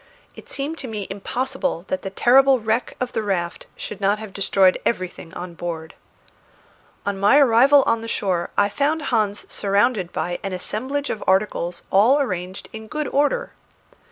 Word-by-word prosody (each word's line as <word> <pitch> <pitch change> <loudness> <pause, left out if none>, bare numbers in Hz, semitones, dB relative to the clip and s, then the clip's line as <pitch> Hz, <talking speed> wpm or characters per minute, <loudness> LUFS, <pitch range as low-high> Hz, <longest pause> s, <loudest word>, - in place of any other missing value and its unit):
It - - -13
seemed 290 +4 -4
to 260 - -4
me 210 -3 -4
impossible 255 - -3
that 185 - -1
the 195 - -4
terrible 260 +6 +5
wreck 220 +2 -1
of 250 0 -3
the 225 - 0
raft 180 -5 -2
should 210 - -7
not 200 +2 +2
have 215 -2 -9
destroyed 190 -1 +3
everything 185 -6 -3
on 175 0 -6
board. 165 -2 -6 1.1
On 200 -1 -2
my 205 +8 +5
arrival 275 +1 +6
on 230 0 +1
the 230 - -6
shore 185 -6 -1
I 200 - +4
found 285 +9 0
Hans 210 -3 0
surrounded 200 -2 +1
by 175 0 -3
an 195 - -4
assemblage 260 +10 -3
of 215 - -5
articles 190 -2 0
all 230 +9 +5
arranged 185 -7 -3
in 220 0 -8
good 300 +4 -3
order. 290 - +1
210 Hz, 165 wpm, -22 LUFS, 190-260 Hz, 1.1 s, arrival